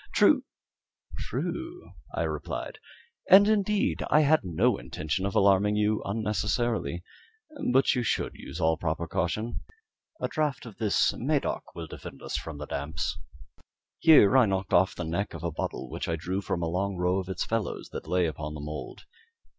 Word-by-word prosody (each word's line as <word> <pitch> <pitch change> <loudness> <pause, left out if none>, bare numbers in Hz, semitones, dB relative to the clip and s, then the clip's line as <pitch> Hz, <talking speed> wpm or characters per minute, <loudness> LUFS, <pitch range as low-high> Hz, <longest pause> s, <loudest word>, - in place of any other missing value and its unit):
"True - - +5 0.7
true," 325 - -5 0.2
I - - 0
replied; - - -4 0.5
"and, 200 +2 +9
indeed, 210 -1 +1
I 150 - +5
had 155 +1 +4
no 90 - +1
intention 80 +9 -3
of 100 - -5
alarming 100 +1 +4
you 105 0 +1
unnecessarily 105 - -1 0.7
but 135 +2 +4
you 125 - 0
should 120 - -1
use - - -9
all 80 0 +2
proper 80 +1 -2
caution. 105 +8 -2 0.6
A - - -1
draught 150 -5 -1
of 115 -4 -11
this 105 -3 +2
Medoc - - -1
will 85 - -5
defend - - -10
us - - -4
from 80 -3 -4
the 75 - -6
damps." 75 +3 -3 0.8
Here 145 -11 +7
I 125 -4 +6
knocked 95 -1 -2
off 95 +2 +4
the 90 - -4
neck 85 +4 -2
of 85 - -8
a 85 - -1
bottle 70 -3 -4
which - - -5
I 85 - +1
drew 90 +5 -3
from 85 -3 -2
a - - 0
long 95 +4 -1
row 90 +2 +1
of 95 0 -6
its 95 - -2
fellows 115 -1 -3
that - - -7
lay 90 -1 +2
upon 75 -1 -4
the - - -6
mould. 75 +1 -7
95 Hz, 170 wpm, -28 LUFS, 85-120 Hz, 0.8 s, and